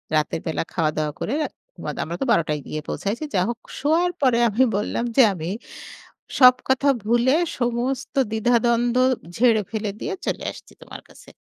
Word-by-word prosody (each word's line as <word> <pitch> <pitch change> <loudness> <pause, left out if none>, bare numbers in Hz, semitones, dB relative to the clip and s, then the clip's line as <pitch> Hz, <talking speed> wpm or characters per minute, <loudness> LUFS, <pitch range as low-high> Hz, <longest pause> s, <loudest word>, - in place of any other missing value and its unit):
রাতের 155 +1 0
বেলা 160 - -1
খাওয়া-দাওয়া 155 -2 -1
করে, 235 - -2 0.5
মাদ - - -4
আমরা 170 - -5
তো - - +1
১২টায় 150 -5 +1
গিয়ে 155 - -4
পৌঁছায়ছি 210 +9 -3
যা 180 - +3
হোক 235 -1 -4 0.2
শোয়ার 330 +5 +2
পরে 255 -3 +3
আমি 225 +5 +3
বললাম 210 +3 -2
যে, 270 - +7
আমি 165 -2 -5 0.9
সব 250 -2 +9
কথা 265 +2 +2 0.2
ভুলে 240 +4 +3 0.2
সমস্ত 245 +2 -2 0.2
দ্বিধাদ্বন্দ্ব 235 +2 +2 0.4
ঝেড়ে 230 -2 +4
ফেলে 215 -2 -2
দিয়ে 405 - -3
চলে - - -2
আসছি - - -15
তোমার - - -10
কাছে। - - -17
235 Hz, 155 wpm, -23 LUFS, 185-250 Hz, 0.9 s, সব